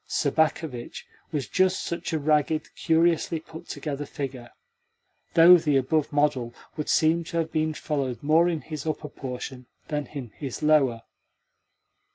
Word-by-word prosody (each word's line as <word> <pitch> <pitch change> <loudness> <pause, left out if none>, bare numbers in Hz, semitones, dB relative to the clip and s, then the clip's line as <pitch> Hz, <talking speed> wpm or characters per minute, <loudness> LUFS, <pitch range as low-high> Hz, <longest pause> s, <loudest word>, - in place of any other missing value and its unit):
Sobakevitch 155 -5 -1 0.3
was 145 -4 -2
just 185 0 +2
such 170 - -4
a 160 - +1
ragged, 155 +1 +1
curiously 165 0 +2
put 160 +1 -12
together 145 -1 -4
figure 130 -5 -6 0.9
though 170 +2 +9
the 150 -4 +2
above 145 +3 +1
model 145 -5 +1 0.2
would 150 -1 -4
seem 165 +2 +3
to 170 - -4
have 160 -1 -1
been 155 0 0
followed 140 -6 -3
more 160 +4 +4
in 165 -3 -2
his 155 -1 -7
upper 155 -1 -3
portion 125 -1 -7 0.2
than 150 -2 -2
in 130 -7 -7
his 135 +4 -6
lower. 135 -7 +3
150 Hz, 145 wpm, -26 LUFS, 135-160 Hz, 0.9 s, though